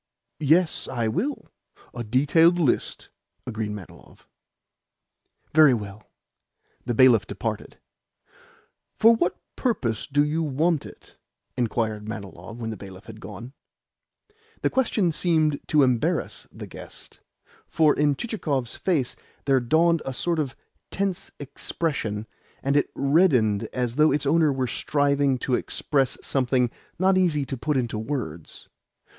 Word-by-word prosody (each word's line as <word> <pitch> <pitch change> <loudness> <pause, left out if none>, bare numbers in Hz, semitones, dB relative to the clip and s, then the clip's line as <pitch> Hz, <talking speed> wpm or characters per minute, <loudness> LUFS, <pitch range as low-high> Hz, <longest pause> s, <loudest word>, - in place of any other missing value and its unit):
"Yes, 160 +3 +2
I 120 -3 -1
will 230 - -3 0.4
a 120 - -5
detailed 145 +9 +4
list," 155 -8 0 0.4
agreed 110 -3 -3
Manilov. 105 -4 -11 1.3
"Very 150 -4 +7
well." 105 -1 -8 0.8
The 120 - 0
bailiff 120 -4 +5
departed. - - -5 1.2
"For 230 +1 +7
what 180 -5 -1 0.2
purpose 125 - -1
do 145 +1 +2
you 155 +2 -1
want 155 +2 0
it?" - - -16 0.4
inquired 110 -3 -1
Manilov 110 +1 -8
when 115 -2 -4
the 110 - -6
bailiff 95 0 -11
had 110 -1 -11
gone. 115 +6 -9 1.1
The - - +2
question 220 -9 +1
seemed 155 -2 +2
to 150 -2 +4
embarrass 125 -3 0
the - - -9
guest, - - -12 0.5
for 155 -2 +3
in 145 -1 +2
Chichikov's 145 - -2
face 155 -10 0 0.3
there 135 -2 +4
dawned 160 +6 +3
a 135 - -5
sort 170 +5 0
of 135 -4 -2 0.3
tense 195 -2 -2
expression, 140 -6 -3 0.4
and 140 +1 +1
it 145 - +2
reddened 135 - +3
as 125 0 -2
though 155 +1 +5
its 145 +1 0
owner 155 +1 +3
were 130 -1 -1
striving 140 +1 +1
to 125 - -3
express 135 +1 0
something 125 -2 +1 0.3
not 185 +1 +3
easy 155 -6 +1
to 135 - -4
put 145 +3 -1
into 120 -4 -1
words. 110 - -5
135 Hz, 130 wpm, -25 LUFS, 115-155 Hz, 1.3 s, Very